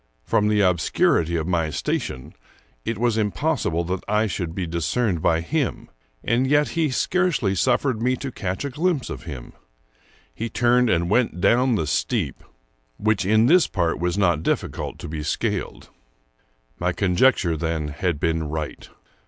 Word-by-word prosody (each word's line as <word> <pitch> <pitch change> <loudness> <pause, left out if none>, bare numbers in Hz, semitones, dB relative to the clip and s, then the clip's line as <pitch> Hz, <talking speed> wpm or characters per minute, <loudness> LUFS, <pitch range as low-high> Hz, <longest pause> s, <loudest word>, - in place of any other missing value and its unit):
From 105 +11 +1
the 105 -1 +3
obscurity 85 -2 +2
of 80 -2 -1
my 85 -3 0
station, 65 -3 -3 0.5
it 115 -1 -3
was 115 0 +1
impossible 85 -4 0
that 90 +2 -3
I 105 +1 +2
should 90 -5 -4
be 95 - -2
discerned 85 +3 -1
by 80 +1 +2
him; 140 - -2 0.3
and 120 +3 +1
yet 145 +1 +3
he 165 -2 0
scarcely 150 - +1
suffered 120 +3 +1
me 125 +2 +2
to 130 +1 -6
catch 95 +3 -4
a 140 - -3
glimpse 155 0 -1
of - - -7
him. 70 -7 -8 0.8
He 115 - -4
turned 120 0 +3
and 85 -2 +1
went 115 -5 +2
down 125 +5 +3
the 90 - 0
steep, 75 - -1 0.5
which 105 -3 0
in 110 +2 +4
this 175 +6 +5
part 85 -3 -1
was 90 +2 -1
not 85 -6 +2
difficult - - -2
to - - -8
be 75 0 -5
scaled. 75 - -3 0.9
My 90 +1 0
conjecture, 90 -2 +2
then, 80 -1 -2
had 80 +1 -2
been 80 -2 -1
right. 80 -1 -5
95 Hz, 160 wpm, -23 LUFS, 85-120 Hz, 0.9 s, this